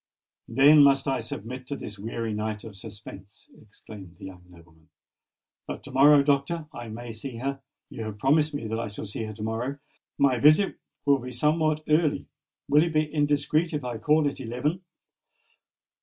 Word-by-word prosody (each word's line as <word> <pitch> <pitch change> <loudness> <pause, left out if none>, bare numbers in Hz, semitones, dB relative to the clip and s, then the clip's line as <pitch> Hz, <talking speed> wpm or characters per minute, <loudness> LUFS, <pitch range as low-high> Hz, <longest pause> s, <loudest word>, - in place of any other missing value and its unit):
"Then 145 +3 +6
must 140 0 +4
I 135 -1 +1
submit 125 +4 -7
to 140 - -3
this 105 -6 -8
weary 115 +1 -4
night 105 0 -3
of 110 -3 -10
suspense!" 100 -1 -12
exclaimed 100 -4 -13
the - - -10
young 90 -2 -11
nobleman. 85 -2 -20 0.8
"But - - -6
to 140 - -10
morrow, 140 +2 +6
Doctor, 145 +3 0
I 120 -1 -7
may 115 +2 -7
see 115 +2 -7
her. 135 +2 -3 0.3
You 110 - -6
have 105 -1 -6
promised 150 +6 +2
that 110 -5 -3
I 115 - -3
shall 105 +1 -7
see 110 +2 -5
her 110 - -6
to 105 0 -8
morrow! 115 +5 -3 0.4
My 130 -3 +3
visit 155 - +4 0.3
will 140 -1 +4
be 125 +1 -7
somewhat 155 +4 +1
early. 155 -1 +2 0.4
Will 145 +1 +5
it 170 -1 -2
be 155 0 0
indiscreet 150 +2 +1
if 145 -2 -2
I 120 -2 -4
call 150 +4 +3
at 140 -1 -4
eleven?" 130 +9 -2
130 Hz, 175 wpm, -26 LUFS, 110-150 Hz, 0.8 s, Then